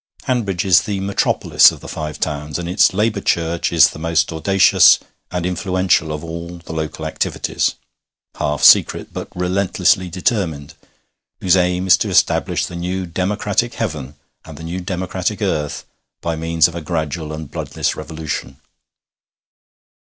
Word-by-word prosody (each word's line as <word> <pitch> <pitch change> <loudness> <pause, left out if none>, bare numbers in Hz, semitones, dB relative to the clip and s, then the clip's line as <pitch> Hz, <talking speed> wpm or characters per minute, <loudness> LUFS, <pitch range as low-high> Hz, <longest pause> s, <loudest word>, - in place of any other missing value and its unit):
Hanbridge 100 -9 -1
is 90 -3 +5
the 100 -2 -3
metropolis 100 +1 +3
of - - -10
the - - -11
Five 75 -1 -5
Towns, 75 -1 -3
and 85 -1 -5
its 90 +4 +4
Labour 105 +2 0
Church 85 -1 0
is - - +6
the - - -10
most 80 +1 0
audacious 95 +4 +5 0.3
and 90 -1 -3
influential 90 -3 0
of 75 -1 -5
all 85 +1 -7
the 85 -1 -10
local 80 0 -4
activities, 80 - -1 0.6
half 75 -1 -2
secret, - - +5
but - - -5
relentlessly 90 0 +1
determined, 85 - -2 0.7
whose 90 -1 +3
aim 90 0 +1
is 95 - +6
to - - -2
establish - - +2
the 90 - -8
new 90 +2 -3
democratic 100 +6 -1
heaven 75 - -4 0.3
and - - -11
the 80 - -10
new 85 +3 -4
democratic 90 0 -3
earth 75 -2 -2 0.3
by 85 -1 -3
means 80 -1 +2
of 85 - -9
a 85 - -5
gradual 80 -1 -3
and 75 -1 -7
bloodless - - -2
revolution. 80 -3 -6
85 Hz, 150 wpm, -19 LUFS, 80-95 Hz, 0.7 s, is